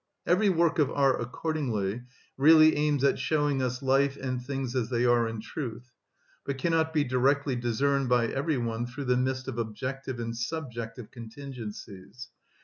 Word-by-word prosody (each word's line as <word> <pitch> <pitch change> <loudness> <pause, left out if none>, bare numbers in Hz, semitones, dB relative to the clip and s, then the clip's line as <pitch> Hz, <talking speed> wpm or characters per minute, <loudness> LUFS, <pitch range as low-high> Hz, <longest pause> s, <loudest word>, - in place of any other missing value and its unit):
Every 195 +4 +3
work 170 -2 +2
of 145 - +3
art 135 -3 +2
accordingly 120 -6 -2 0.3
really 155 +2 +7
aims 145 -2 +1
at 140 - +3
showing 145 -3 +1
us 125 +1 -2
life 135 +1 +2
and 130 -2 -3
things 135 -1 -4
as 120 -3 0
they 120 -1 +1
are 120 -1 +3
in 115 -1 -5
truth, 125 -1 -6 0.5
but 140 -1 -3
cannot 160 +2 +1
be 155 -2 +2
directly 135 +1 +1
discerned 130 +3 0
by 120 -1 +3
every 140 +5 -1
one 115 0 -2
through 130 +3 -6
the 125 0 +2
mist 130 +1 -1
of 120 - -4
objective 130 +3 -4
and 115 0 -4
subjective 120 -3 -5
contingencies. 115 -3 -9
130 Hz, 160 wpm, -28 LUFS, 120-140 Hz, 0.5 s, really